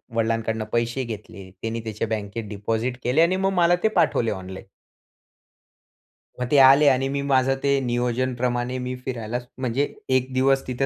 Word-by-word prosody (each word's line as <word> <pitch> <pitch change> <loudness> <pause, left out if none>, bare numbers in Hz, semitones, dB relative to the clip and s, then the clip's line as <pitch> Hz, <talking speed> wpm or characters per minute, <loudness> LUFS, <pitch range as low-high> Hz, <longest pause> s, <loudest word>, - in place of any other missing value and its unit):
वडिलांकडून 115 -1 0
पैसे 120 +3 0
घेतले. 105 -4 -8
त्यानी 115 +1 -3
त्याच्या 110 0 -3
बँकेत 110 0 -4
डिपॉझिट 115 +4 -2
केले 130 +6 +2
आणि 170 +3 +3
मग 195 - +1
मला 175 -1 +4
ते 220 - +5
पाठवले 115 -2 +2
ऑनलाईन. 95 -1 -7 1.7
मग 125 - -1
ते 145 - +5
आले 140 +2 +7
आणि 135 0 +1
मी 140 0 -2
माझं 135 -1 +2
ते 140 -1 +3
नियोजनप्रमाणे 125 0 -1
मी 125 0 -3
फिरायलाच 120 -1 -4
म्हणजे 130 +2 -1 0.2
1 130 0 0
दिवस 135 +1 +2
तिथे 130 +2 -1
125 Hz, 155 wpm, -23 LUFS, 115-135 Hz, 1.7 s, आले